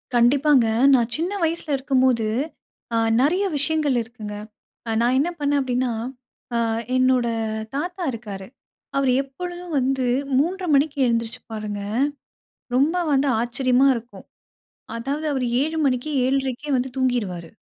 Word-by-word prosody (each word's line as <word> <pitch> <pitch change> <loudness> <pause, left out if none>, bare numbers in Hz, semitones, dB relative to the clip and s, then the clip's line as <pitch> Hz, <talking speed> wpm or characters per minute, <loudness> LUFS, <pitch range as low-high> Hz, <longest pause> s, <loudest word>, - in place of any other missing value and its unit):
கண்டிப்பாங்க. 260 +1 +4 0.3
நான் 240 -2 +3
சின்ன 340 +4 -1
வயசுல 325 -2 -1
இருக்கும்போது, 260 -4 +2 0.7
அ - - +3 0.2
நெறைய 330 +9 +2
விஷயங்கள் 290 -1 +1
இருக்குங்க. 220 -3 -8 0.5
அ - - -1
நான் 245 +2 +3
என்ன 310 +5 +1
பண்ணேன் 285 0 +1
அப்டீன்னா? 250 -1 0 0.6
அ - - +2 0.4
என்னோட 255 -1 +3 0.5
தாத்தா 355 +5 -3
இருக்காரு. 205 -5 -7 0.5
அவர் 270 -2 +3
எப்பொழுதும் 350 +5 -7
வந்து 260 0 0 0.3
3:30 360 +6 0
மணிக்கு 290 +1 +2
எழுந்திரிச்சுப்பாருங்க. 225 -3 -3 1.0
ரொம்ப 295 +7 +3 0.2
வந்து 275 +1 +3
ஆச்சரியமா 255 +2 +2
இருக்கும். 235 0 -8 0.7
அதாவது 280 +6 -3
அவர் 265 -2 -1 0.2
7:00 315 +2 -2
மணிக்கே 260 +2 0
7:30கே 270 +2 -1
வந்து 255 +1 -1
தூங்கிருவாரு. 210 -10 -1
260 Hz, 120 wpm, -23 LUFS, 240-290 Hz, 1.0 s, கண்டிப்பாங்க